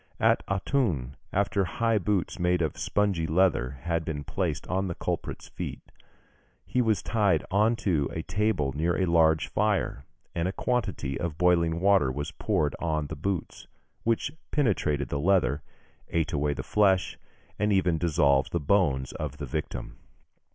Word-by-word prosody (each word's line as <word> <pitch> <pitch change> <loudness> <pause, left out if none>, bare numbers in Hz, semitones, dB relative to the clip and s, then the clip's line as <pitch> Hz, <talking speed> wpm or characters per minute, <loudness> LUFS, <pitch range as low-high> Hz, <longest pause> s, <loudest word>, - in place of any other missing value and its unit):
At - - +3
Autun, 95 - 0 0.2
after 100 0 +1
high 115 +5 +1
boots 95 -1 -1
made 90 0 +2
of 75 - -2
spongy 95 -2 0
leather 80 -7 +2
had 85 -1 0
been 75 -2 -4
placed - - -2
on 95 +1 0
the 85 - -4
culprit's - - -4
feet, - - -6 0.8
he 125 - +1
was 110 -3 +1
tied 105 -3 +2
on 105 +4 +3
to 80 -8 +2
a 80 - -4
table 90 -7 0
near 85 +5 0
a 95 - +3
large 80 -2 +3
fire, 105 -9 0 0.3
and 85 0 -1
a - - 0
quantity 100 - -1
of 85 -3 -3
boiling 85 -2 +3
water 95 -8 +4
was 75 +3 -4
poured 75 -2 0
on 80 -3 -1
the 80 - -6
boots, 90 +4 -4 0.3
which 115 +4 0 0.2
penetrated 80 - +1
the 70 - -2
leather, 80 -4 +2 0.5
ate 80 -2 0
away 75 0 0
the - - -5
flesh, 95 -3 +2 0.4
and 105 0 +2
even 90 -4 +2
dissolved 75 -5 +2
the 85 - 0
bones 75 -5 +1
of - - -5
the - - -5
victim. - - -5
85 Hz, 160 wpm, -27 LUFS, 75-100 Hz, 0.8 s, water